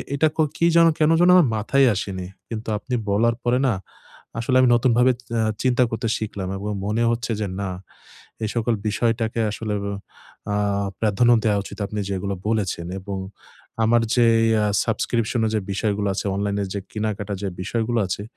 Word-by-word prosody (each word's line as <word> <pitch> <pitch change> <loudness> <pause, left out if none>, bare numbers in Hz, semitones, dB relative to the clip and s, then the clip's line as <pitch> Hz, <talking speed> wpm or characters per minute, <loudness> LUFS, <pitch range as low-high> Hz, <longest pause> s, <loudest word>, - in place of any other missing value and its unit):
এটা 155 +3 +3
কো 160 - +4
কি 170 - +2
যেন, 170 0 +7
কেন 155 0 +4
যেন 175 +1 +5
আমার 175 -6 +6
মাথায়ই 135 +6 +3
আসেনি। 95 -1 -4 0.2
কিন্তু 110 -1 -5
আপনি 125 +4 -4 0.2
বলার 115 +3 +2
পরে 120 +1 +2
না, 120 - +2 0.7
আসলে 125 +3 0
আমি 130 - +4
নতুনভাবে 125 +1 +4 0.2
অ্যা 115 -1 +1 0.2
চিন্তা 125 -1 +3
করতে 115 +1 -2
শিখলাম 100 -3 -4
এবং 105 +2 -4
মনে 110 +3 0
হচ্ছে 115 0 -2
যে 105 - -1
না, 100 - -2 0.7
এই 110 - -1
সকল 115 0 +1
বিষয়টাকে 115 +1 0
আসলে 105 0 -4
অ 100 - -3 0.6
অ্যা 105 0 0 0.4
প্রাধান্য 110 +2 +3
দেওয়া 105 -2 +3
উচিত - - -10
আপনি 105 - -4
যেগুলো 100 0 -2
বলেছেন 105 -6 -1
এবং 100 +1 -5 0.7
আমার 115 +1 +4
যেই 115 -2 +4 0.2
আ - - +2 0.2
সাবস্ক্রিপশন 115 +1 0
এর 110 - 0
যে - - +2
বিষয়গুলা 100 0 -1
আছে, - - -3
অনলাইন 100 0 -1
এ - - -2
যে - - -1
কেনাকাটা 105 -1 -3
যে 100 - -2
বিষয়গুলা 115 +4 -1
আছে, 95 +2 -3
110 Hz, 175 wpm, -23 LUFS, 100-120 Hz, 0.7 s, যেন